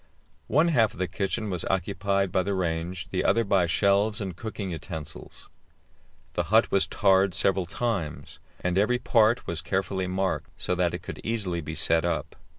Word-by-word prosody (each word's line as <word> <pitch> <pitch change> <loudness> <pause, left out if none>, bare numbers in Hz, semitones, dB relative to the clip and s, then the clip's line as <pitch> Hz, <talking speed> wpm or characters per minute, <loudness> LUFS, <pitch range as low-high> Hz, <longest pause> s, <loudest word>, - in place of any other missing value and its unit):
One 155 +5 +3
half 115 -9 +3
of - - -14
the 95 +1 -1
kitchen 100 +4 -2
was 90 -3 -2
occupied 100 +1 0
by 95 - +2
the 100 +1 -1
range, 85 0 -2
the - - 0
other 115 - +3
by 95 -4 +2
shelves 100 +4 +2
and 95 -5 -4
cooking 100 -1 -5
utensils. 80 -2 -8 0.9
The - - -1
hut - - +3
was 100 - +3
tarred 95 -2 +3
several 95 0 +1
times, 100 -7 -3 0.2
and 90 +1 +1
every 125 +5 +3
part 120 -1 +3
was 85 -1 -3
carefully 95 -1 -1
marked, 95 +1 -1
so - - -1
that 90 -1 +1
it - - -8
could - - -7
easily 100 -7 -1
be 80 +1 -6
set 80 +1 +2
up. 85 -1 -2
95 Hz, 175 wpm, -27 LUFS, 85-105 Hz, 0.9 s, One